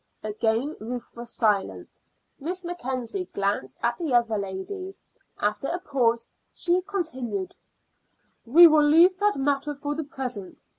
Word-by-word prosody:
Again 225 +6 0
Ruth 240 +2 -6
was 235 0 -7
silent. 210 -4 0 0.4
Miss 360 +6 -4
Mackenzie 340 - -4
glanced 195 -10 -1
at 235 0 0
the 305 -7 0
other 235 -2 +3
ladies. 205 - -5 0.4
After 210 +6 -1
a 350 - -1
pause 235 -8 0 0.3
she 355 +1 +1
continued: 260 - -4 0.9
"We 320 +9 +8
will 310 -2 +7
leave 340 +5 +5
that 415 0 +2
matter 280 +1 0
for 290 +1 -3
the 315 +2 -3
present. 255 - -7
265 Hz, 135 wpm, -26 LUFS, 225-335 Hz, 0.9 s, We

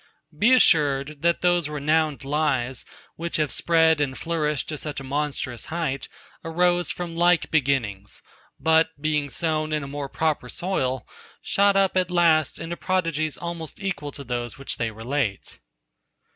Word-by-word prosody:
Be 215 +11 +4
assured, 145 - +3
that 170 0 +2
those 175 -3 +2
renowned 150 0 0
lies, 135 -4 0 0.3
which 170 +1 -3
have 150 -2 0
spread 160 -2 +3
and 130 -3 -1
flourished 150 -4 -1
to 155 - -4
such 150 -2 -5
a - - -8
monstrous 135 -3 -3
height, 160 -5 -3 0.3
arose 175 +1 +1
from 175 -2 -4
like 175 0 +3
beginnings; 125 -10 -1 0.4
but 160 -1 +2
being 150 -1 0
sown 155 +1 -1
in 150 -1 0
a - - -6
more 140 0 -5
proper 155 -5 -1
soil, 130 - -2 0.4
shot 200 0 +3
up 195 -1 +3
at 185 -1 +2
last 165 -4 +3
into 170 +1 -5
prodigies 165 -5 -1
almost 170 -2 -6
equal 190 -7 -3
to 140 - -8
those 120 -2 -4
which 135 - -5
they 115 - -1
relate. 110 0 -3
155 Hz, 150 wpm, -24 LUFS, 140-170 Hz, 0.4 s, Be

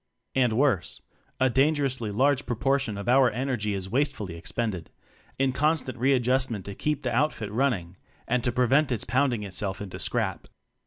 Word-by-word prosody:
And 125 -4 +2
worse 120 - 0 0.4
a 130 -1 +3
dangerously 135 -4 +1
large 135 +6 +1
proportion 135 -2 0
of 100 - -5
pur 130 +1 +5
energy 120 -4 -2
is 95 -1 -4
wastefully 115 - -1
expended 95 0 -3 0.5
in 135 0 +2
constant 145 0 0
readjustment 125 -4 +1
to 100 - -6
keep 150 +7 -2
the - - -1
outfit 120 -7 0
running, 105 -8 -1 0.3
and 125 0 +1
to 125 - +2
prevent 130 +4 +2
its 120 - -1
pounding 130 -4 +1
itself 95 0 -3
into 100 -3 -7
scrap. - - -1
125 Hz, 155 wpm, -26 LUFS, 105-135 Hz, 0.5 s, pur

